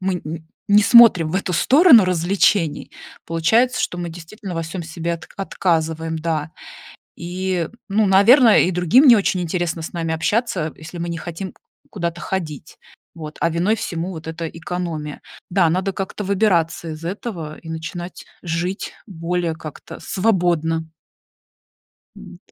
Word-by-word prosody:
мы 190 0 -1
н 160 +1 -7 0.2
не 205 +1 +6
смотрим 225 -7 +7
в - - -5
эту 190 -1 -1
сторону 260 - +6
развлечений, 180 -1 +1 0.3
получается, 220 +10 +2
что 175 - -2
мы 175 - -4
действительно 175 +4 -9
во 165 - -2
всем 165 +2 -6
себе 165 +1 -4
от 165 - -11
отказываем. 160 -4 -1
Да. 155 -1 -2 0.6
И, 180 0 -3 0.2
ну, 210 +1 +2
наверно, 220 +5 +6
и 180 - +2
другим 180 - +4
не 240 - +9
очень 195 -3 +1
интересно 175 -1 -2
с 160 - -7
нами 165 -1 -2
общаться, 170 -2 -1
если 160 +2 -10
мы 170 0 -4
не 170 - -4
хотим 175 +3 -6 0.4
куда-то 170 -3 -4
ходить, 155 -6 -5 0.4
вот, 155 -2 -8
а 170 - +3
виной 175 +7 +1
всему 175 -3 -4
вот 160 -2 -9
эта 165 0 -4
экономия. 165 -3 -5 0.3
Да, 175 -3 +3
надо 185 +4 0
как-то 195 +2 -5
выбираться 185 -5 +1
из 155 +1 -8
этого 175 -5 -5
и 165 - -11
начинать 160 +2 -7 0.2
жить 175 +3 -3
более 175 -3 -2
как-то 155 -2 -10
свободно. 170 -6 0 1.3
Вот. - - -14
175 Hz, 145 wpm, -20 LUFS, 160-195 Hz, 1.3 s, не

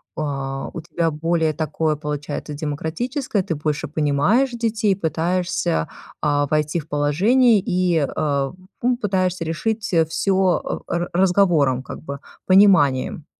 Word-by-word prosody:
А 135 -2 -3
у 165 - -5
тебя 165 0 -1
более 160 +1 0
такое 155 0 -1
получается 150 0 -5
демократическое, 160 - -2
ты 165 - -3
больше 150 +1 -2
понимаешь 155 - +2
детей, 225 -3 0
пытаешься, 170 - -1 0.3
а, 145 -1 +2
войти 150 +3 0
в 155 - -11
положение 200 - +3
и, 180 -2 +1
э, 140 -1 -1 0.3
ну, 245 0 +1
пытаешься 185 -6 -1
решить, 210 +6 -2
э, 165 -1 +4
всё 190 +4 0
о 185 -2 0
ра 175 - -1
ра - - -13
разговором, 175 -8 +3
как - - -8
бы, 140 -2 -7 0.3
пониманием. 165 -8 +4
160 Hz, 135 wpm, -21 LUFS, 145-190 Hz, 0.3 s, э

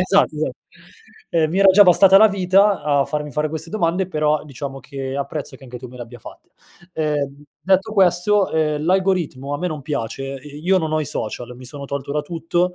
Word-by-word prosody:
Esatto, 185 -3 +2
esatt 155 +1 -3 0.7
ehm, 160 -2 +1
mi 180 - -1
era 195 0 +6
già 205 +2 +8
bastata 190 +1 +6
la 220 +2 +7
vita 195 0 +3
a 145 -2 +2
farmi 150 -1 -4
fare 150 +3 -1
queste 160 +1 -6
domande, 185 -2 0
però 150 -3 0
diciamo 135 -1 -7
che 135 +1 -6
apprezzo 140 +1 -4
che 135 - -16
anche 125 -1 -9
tu 125 - -9
me 125 - -13
le 125 - -6
abbia 120 +1 -11
fatte. - - -14 0.4
Ehm, 145 -2 -2 0.2
detto 195 +3 +1
questo, 190 +1 +3
ehm, 150 -1 0
l'algoritmo 175 -7 0
a - - -3
me 180 - -2
non 155 -4 -4
piace, 135 -1 -4
ehm, 145 +2 -11
io 185 +2 +3
non 160 -2 -3
ho 155 - +1
i - - -2
social 120 +2 -5
mi 130 - -12
sono 140 +2 -8
tolto 140 0 -5
da 150 - 0
tutto, 175 +3 -1
155 Hz, 210 wpm, -20 LUFS, 140-180 Hz, 0.7 s, già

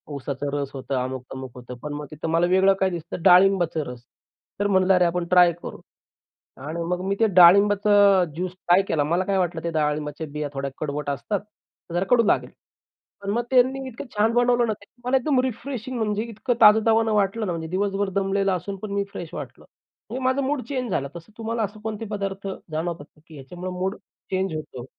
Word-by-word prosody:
ऊसाचा 140 +1 -4
रस 140 -1 -2
होतं, 135 0 -4
अमुक-तमुक 130 0 -6
होतं. 125 0 -9
पण 150 0 -4
मग 150 0 -5
तिथं 155 +1 -5
मला 165 +2 +3
वेगळं 190 +2 +4
काय 190 - +2
दिसतं 170 -1 -6
डाळिंबाचा 180 -3 +5
रस. 120 -1 -12 0.6
तर 205 - +2
म्हणलं 190 -1 +3
अरे 180 -1 +4
आपण 175 0 0
ट्राय 180 -1 +6
करू - - -8 0.9
आणि 165 +2 -4
मग 180 0 -1
मी 200 - +1
ते 225 - +4
डाळिंबाचा 200 +1 +6
ज्यूस 180 +2 -3
ट्राय 185 0 +3
केला. 150 -3 +1
मला 170 +5 +1
काय 195 0 0
वाटलं 175 -3 -1
ते 170 - -1
डाळिंबाच्या 150 0 -2
बिया 150 0 -3
थोड्या 135 0 -3
कडवट 150 -1 -3
असतात, 140 +9 -2 0.5
जरा 175 +2 0
कडू 245 -2 +5
लागेल. - - +1 0.7
पण 200 - -5
मग 235 +3 0
त्यांनी 260 +1 +3
इतकं 250 0 -8
छान 215 +2 +2
बनवलं 245 0 +3
ना, 220 - 0
त्याने 210 +4 -19
मला 265 +1 +4
एकदम 265 +1 +1
रिफ्रेशिंग 255 0 -4
म्हणजे 215 -1 -1
इतकं 235 +2 -2
ताजतावान 220 +1 +6
वाटलं 210 +1 +1
ना, 185 - -2
म्हणजे 165 -1 -4
दिवसभर 195 +3 -1
दमलेला 195 0 +1
असून 185 +3 -5
पण 215 - -5
मी 200 0 0
फ्रेश 170 - -7
वाटलं. - - -8 0.4
म्हणजे 255 +4 -4
माझं 260 +2 +2
मूड 275 0 -1
चेंज 255 -5 -2
झालं. 140 -5 -1
तसं 170 +5 -11
तुम्हाला 225 0 -2
असं 210 +1 -5
कोणते 220 0 -4
पदार्थ 195 -1 -4 0.2
जाणवतात 160 -1 -3
का, 150 - -24
की 160 - -13
ह्याच्यामुळे 175 +7 -7
मूड 190 +2 -1 0.4
चेंज 190 -3 -1
होतो? 130 -5 -7
190 Hz, 195 wpm, -24 LUFS, 160-215 Hz, 0.9 s, ट्राय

